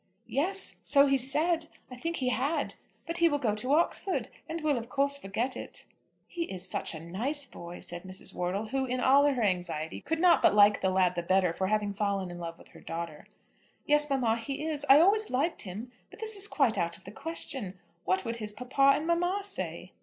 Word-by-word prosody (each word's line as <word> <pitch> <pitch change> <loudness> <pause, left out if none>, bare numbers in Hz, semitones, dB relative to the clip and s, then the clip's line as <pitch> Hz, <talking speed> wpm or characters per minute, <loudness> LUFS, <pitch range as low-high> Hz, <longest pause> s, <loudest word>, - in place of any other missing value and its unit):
"Yes; 375 +8 -1
so 280 -1 +5
he 275 -1 +3
said. 310 +6 +2 0.2
I - - -6
think 330 +7 -3
he 255 -4 0
had. 285 +4 0 0.3
But 335 +1 -1
he 340 0 +5
will 290 - +1
go 235 -7 0
to 255 +7 +1
Oxford, 345 +3 0 0.2
and 330 +1 -3
will 300 -2 +2
of 235 -1 -5
course 280 +1 +1
forget 235 +5 -2
it." - - -5 0.4
"He 340 -1 -3
is 185 - -4
such 180 - -1
a - - -6
nice 235 - -2
boy," 170 -6 -9
said 175 0 -4
Mrs. 185 +1 -6
Wortle, 190 +5 -2
who, 270 0 0
in 255 0 -2
all 275 +3 +5
her 270 -5 +2
anxiety, 175 -5 -1
could 325 - -2
not 350 +1 +5
but - - +5
like 205 0 +6
the 190 - +2
lad 185 -1 +3
the 175 - -2
better 180 0 +2
for 190 +2 -1
having 210 0 0
fallen 200 -2 -1
in 175 - -8
love 165 -1 -6
with - - -17
her - - -15
daughter. 165 -2 -6 0.6
"Yes, 295 0 +3
mamma; 245 -5 +1
he 275 +6 -4
is. 295 -3 -2
I 275 +2 +9
always 420 +5 +4
liked 285 +7 0
him. 215 +6 -6 0.2
But - - -15
this 440 -1 -3
is 400 0 -1
quite 260 - +2
out 170 0 -1
of - - -21
the 195 - -10
question. 265 - -4 0.3
What 190 +1 0
would 230 0 -2
his 210 -2 -5
papa 265 +4 +3
and 305 - -3
mamma 355 +4 +1
say?" 395 0 -5
255 Hz, 220 wpm, -29 LUFS, 190-300 Hz, 0.6 s, I